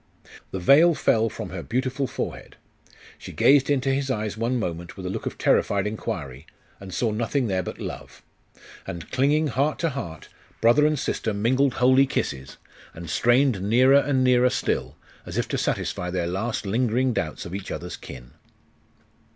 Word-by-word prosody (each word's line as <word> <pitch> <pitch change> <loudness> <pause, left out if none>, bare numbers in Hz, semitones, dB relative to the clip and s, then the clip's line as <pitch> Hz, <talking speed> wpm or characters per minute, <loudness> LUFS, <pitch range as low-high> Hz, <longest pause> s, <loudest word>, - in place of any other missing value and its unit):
The - - -5
veil 155 - +6
fell 115 -4 +2
from 90 -3 -7
her 95 -1 -5
beautiful 130 +6 -2
forehead. - - -6 0.6
She - - -9
gazed 140 0 +4
into 135 -1 +1
his 135 0 -1
eyes 110 -4 -2
one 115 +3 -1
moment 85 -5 -5
with 95 - -7
a 90 - -2
look - - -4
of - - -5
terrified 100 -1 +2
inquiry, 80 - -5 0.3
and 95 -1 -10
saw 110 +5 0
nothing 120 +5 -1
there 95 -4 0
but - - -7
love.... - - -8 0.6
And 85 -2 -7
clinging 145 +4 +2
heart 140 +6 0
to 165 - 0
heart, 85 - -7 0.3
brother 130 +6 +5
and 155 0 0
sister 110 -5 -2
mingled 130 +5 +2
holy 130 +2 +4
kisses, 65 - -3 0.4
and 85 -1 -7
strained 120 -3 +3
nearer 130 +7 +5
and 135 -2 +1
nearer 125 0 +4
still, 130 - -2 0.3
as - - -7
if - - 0
to - - -1
satisfy 90 - -2
their 90 -1 -1
last 100 +7 -3
lingering 120 +4 +1
doubts 80 -7 -3
of 85 - -8
each 100 0 -5
other's 90 0 -5
kin. 60 0 -11
115 Hz, 170 wpm, -24 LUFS, 95-135 Hz, 0.6 s, veil